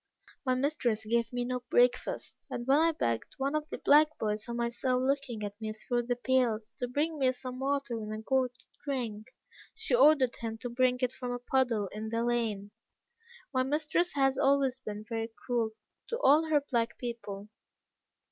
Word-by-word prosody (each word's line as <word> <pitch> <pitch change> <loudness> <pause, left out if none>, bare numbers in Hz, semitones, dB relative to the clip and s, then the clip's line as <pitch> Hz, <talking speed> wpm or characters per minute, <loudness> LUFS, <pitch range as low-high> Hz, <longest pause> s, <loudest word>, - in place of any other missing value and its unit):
My 255 -2 +2
mistress 255 -5 0
gave 230 +1 +1
me 245 -1 -2
no 250 0 -2
breakfast, 245 +1 +2 0.2
and 240 - -4
when 275 +3 +5
I 330 +1 +4
begged 115 - -2
one 275 +2 -1
of 305 0 -2
the - - -4
black 305 +2 +5
boys 210 -1 -1
whom 235 0 -4
I 235 0 +1
saw 250 +2 0
looking 260 -3 -1
at 205 +1 -6
me 215 0 -3
through 240 +2 -2
the 245 - +1
pales, 240 -4 +1
to 245 - -1
bring 300 +5 -1
me 260 -2 +4
some 255 0 -6
water 275 -4 -1
in 215 0 -5
a 215 - -4
gourd 255 +2 +1
to - - -27 0.2
drink, 235 -7 -3 0.5
she 440 +2 -2
ordered 300 - +5
him 225 -1 -4
to 245 +1 -6
bring 250 +1 +2
it 250 - +2
from 255 -1 -5
a - - -2
puddle 245 -4 +1
in 215 +2 -5
the 230 +1 0
lane. 225 -4 -1 0.8
My 255 - +3
mistress 305 +6 0
has 270 -1 +2
always 275 -2 +3
been 210 -4 -6
very 225 -1 -3 0.2
cruel 235 -3 +1 0.4
to 470 - -3
all 310 - +5
her 300 -2 +3
black 235 -5 -1
people. 215 -4 -6
250 Hz, 190 wpm, -30 LUFS, 230-275 Hz, 0.8 s, when